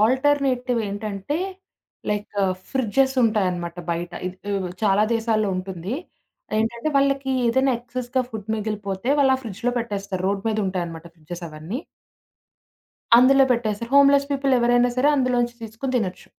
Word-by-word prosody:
Alternative 260 0 +2
ఏంటంటే, 205 +6 -3 0.7
like 210 0 -3 0.4
fridges 265 +1 +1
ఉంటాయన్నమాట 180 -6 0
బయట. 170 +1 -3
ఇది 190 +3 -5
ఉ - - -4
చాలా 205 -1 +4
దేశాల్లో 220 -2 +1
ఉంటుంది. 185 +3 -4 0.6
ఏంటంటే, 235 +5 -1
వాళ్ళకి 275 -1 +2
ఏదైనా 265 +3 +3
ఎక్సెస్‌గా 250 +1 -2
ఫుడ్ 220 -1 -7
మిగిలిపోతే, 210 0 -4
వాళ్ళు 265 -2 +5
ఆ - - -9
ఫ్రిడ్జులో 230 +3 -2
పెట్టేస్తారు. 200 -5 -4
రోడ్డు 200 0 -2
మీద 215 0 0
ఉంటాయన్నమాట 170 -3 -4
ఫ్రిడ్జెస్ 170 +2 -8
అవన్నీ. 160 - -6 1.4
అందులో 270 +2 +6
పెట్టేస్తారు. 230 -1 -2
హోమ్‌లెస్ 280 0 +6
పీపుల్ 275 -1 +1
ఎవరైనా 245 +1 +3
సరే 265 +3 +3
అందులోంచి 245 -2 +1
తీసుకొని 225 +4 -5
తినొచ్చు. 190 -6 -3
225 Hz, 130 wpm, -23 LUFS, 195-255 Hz, 1.4 s, అందులో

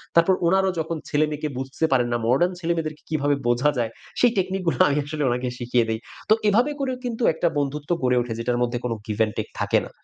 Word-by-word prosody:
তারপর 170 +3 +5
ওনারাও 190 +1 +3
যখন 160 +1 -2
ছেলেমেয়েকে 150 0 0
বুঝতে 135 +4 -2
পারেন 125 -2 +3
না, 120 - +2
modern 140 +9 +3
ছেলেমেয়েদেরকে 160 -2 -2
কিভাবে 145 -2 +1
বোঝা 120 +5 +3
যায়? 115 -2 0 0.3
সেই 245 -2 +5
technique 190 0 -1
-গুলো - - +1
আমি 145 - +1
আসলে 150 0 -3
ওনাকে 125 +1 -1
শিখিয়ে 120 -1 +1
দেই। 110 0 -1 0.3
তো - - +8 0.2
এভাবে 240 +8 +3
করেও 260 -2 -1
কিন্তু 235 0 -3
একটা 170 - 0
বন্ধুত্ব 145 +1 -3
গড়ে 125 -1 +3
ওঠে 120 -1 -4
যেটার 120 +1 0
মধ্যে 120 0 0
কোন 120 - -1 0.2
give 105 0 -4
and 105 - -6
take - - -3
থাকে - - +2
না। - - -10
150 Hz, 215 wpm, -24 LUFS, 125-170 Hz, 0.3 s, তো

